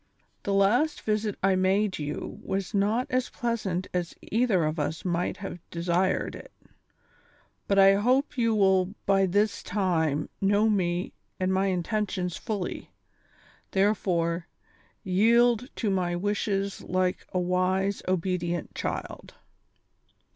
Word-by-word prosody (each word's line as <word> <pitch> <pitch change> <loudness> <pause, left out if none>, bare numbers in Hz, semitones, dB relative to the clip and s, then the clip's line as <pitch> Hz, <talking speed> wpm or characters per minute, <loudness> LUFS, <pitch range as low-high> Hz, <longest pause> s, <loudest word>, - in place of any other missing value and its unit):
The 200 - -2
last 240 +11 +3
visit 215 -1 -1
I 195 0 +4
made 190 +1 +1
you 150 0 -5
was 195 +1 -3
not 210 +5 +1
as 255 -1 0
pleasant 210 -7 -2
as 180 -2 -2 0.2
either 220 -7 +2
of 155 +1 -2
us 155 +4 -3
might 175 0 -1
have 195 -3 -7
desired 175 +2 0
it, - - -11 1.2
but 200 - +2
I 195 0 +8
hope 250 +8 +2
you 230 -3 +2
will 190 -1 +3
by 195 -1 +3
this 205 +3 +1
time 160 -7 0
know 205 +2 +3
me 180 -3 0 0.3
and 185 0 +1
my 190 +1 +2
intentions 185 -1 -1
fully; 205 -5 -4 0.8
therefore, 180 -4 +1 0.6
yield 235 +6 +3
to 215 -4 -1
my 180 -2 0
wishes 200 +1 -1
like 185 0 -1
a 185 - 0
wise, 185 +2 0
obedient 175 -2 -1
child." - - -5
195 Hz, 125 wpm, -27 LUFS, 180-210 Hz, 1.2 s, I